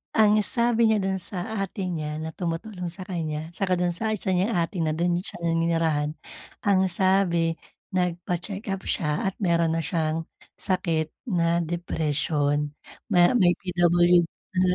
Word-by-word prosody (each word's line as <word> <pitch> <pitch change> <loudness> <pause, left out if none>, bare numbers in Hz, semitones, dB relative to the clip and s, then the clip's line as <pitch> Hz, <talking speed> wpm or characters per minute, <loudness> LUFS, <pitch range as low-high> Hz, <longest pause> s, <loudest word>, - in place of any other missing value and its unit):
Ang 215 -1 +5
sabi 235 -1 +3
niya 215 -2 +3
dun 190 0 0
sa 195 +3 -4
ate 195 0 -3
niya 155 -2 -3
na 160 - -4
tumutulong 180 +2 -4
sa 185 +2 -5
kaniya, 160 -4 -4
tsaka 185 +1 0
dun 175 0 +1
sa 220 +6 -1
isa 195 -2 -3
niyang 185 +5 +1
ate 170 +2 -1
na 155 -1 +1
dun 175 +1 +1
siya 180 -1 -7
naninirahan. 165 -3 +1 0.5
Ang 190 -2 +3
sabi 175 -3 +2 0.3
nagpa-check-up 185 +2 -2
siya 150 -3 0
at 190 - -2
meron 170 -2 +2
na 165 - 0
siyang 160 0 -1 0.3
sakit 165 -4 0 0.2
na 170 -2 +2
depression. 150 -3 -1 0.4
Ma 175 +3 +5
may 180 -6 +5
PWD 175 -1 +4 0.3
na 180 - +2
175 Hz, 145 wpm, -25 LUFS, 165-190 Hz, 0.5 s, Ang